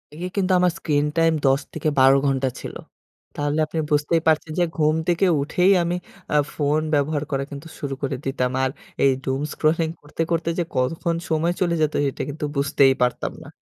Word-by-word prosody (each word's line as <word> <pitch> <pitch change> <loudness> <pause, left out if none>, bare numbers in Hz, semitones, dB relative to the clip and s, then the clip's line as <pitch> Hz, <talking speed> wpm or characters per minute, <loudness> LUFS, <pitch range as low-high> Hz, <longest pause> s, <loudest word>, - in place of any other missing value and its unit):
এ - - -11 0.2
কিন্তু 190 -1 +1
আমার 180 -1 +3
screen 145 -2 +1
time 165 0 +4
১০ 135 +1 +4
থেকে 155 -1 -1
১২ 135 +1 +7
ঘন্টা 135 -1 +1
ছিল। - - -7 0.6
তাহলে 145 +1 -1
আপনি 160 +1 -4
বুঝতেই 150 +3 +2
পারছেন 155 0 +2
যে - - +4
ঘুম 155 0 +3
থেকে 175 +2 +2 0.2
উঠেই 180 +6 +2
আমি 175 +1 -1 0.4
আ - - +6 0.2
ফোন 150 +1 +1
ব্যবহার 145 +1 +1
করা 135 0 0
কিন্তু 140 +3 -8
শুরু 140 -2 -3
করে 135 -1 -1
দিতাম। 130 -2 -1
আর 130 - +2 0.4
এই 135 - +6
doomscrolling 155 +4 0
করতে, 145 +2 -6
করতে 165 0 0
যে - - +2
কতক্ষণ 165 +6 0
সময় 165 +2 +1
চলে 170 -2 +2
যেত 155 0 +1 0.2
এটা - - -6
কিন্তু 150 +1 -4
বুঝতেই 140 -1 +4
পারতাম 125 - -1
না। - - -12
150 Hz, 185 wpm, -23 LUFS, 140-165 Hz, 0.6 s, ১২